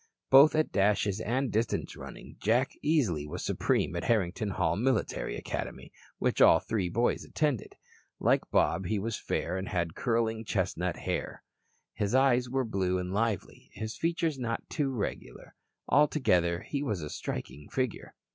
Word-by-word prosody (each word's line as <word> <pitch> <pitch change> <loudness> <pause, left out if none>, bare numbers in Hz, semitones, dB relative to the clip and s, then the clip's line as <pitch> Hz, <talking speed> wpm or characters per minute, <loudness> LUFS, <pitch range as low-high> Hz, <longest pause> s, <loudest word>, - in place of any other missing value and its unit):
Both 140 +4 +8
at 155 0 +1
dashes 100 0 +2
and 125 +2 -1
distance 110 +1 -1
running - - -10
Jack 120 +5 +2
easily 110 - +1
was - - -5
supreme - - 0
at - - -3
Harrington 105 -2 +1
Hall 95 -4 0
Military 125 +1 0
Academy, - - -5 0.3
which - - 0
all - - +8
three 95 -5 -2
boys 120 +6 +1
attended. 145 -8 -1 0.4
Like - - +2
Bob 95 - +2
he 110 - 0
was 110 +2 -3
fair 90 - -2
and 95 - -5
had 85 -3 -1
curling 115 -1 0
chestnut 105 - -1
hair. - - -4 0.5
His 105 +3 -1
eyes 125 -2 +3
were 130 0 0
blue 95 -4 0
and 90 0 -3
lively, 110 -2 -2
his 110 +1 -5
features 165 -3 -1
not 115 -2 -3
too 145 -4 0
regular. 120 -7 -5 0.3
Altogether, 90 - +3
he 140 - -3
was 105 - -2
a 75 - -5
striking 70 +3 -6
figure. 130 -4 -3
110 Hz, 155 wpm, -30 LUFS, 95-130 Hz, 0.5 s, Both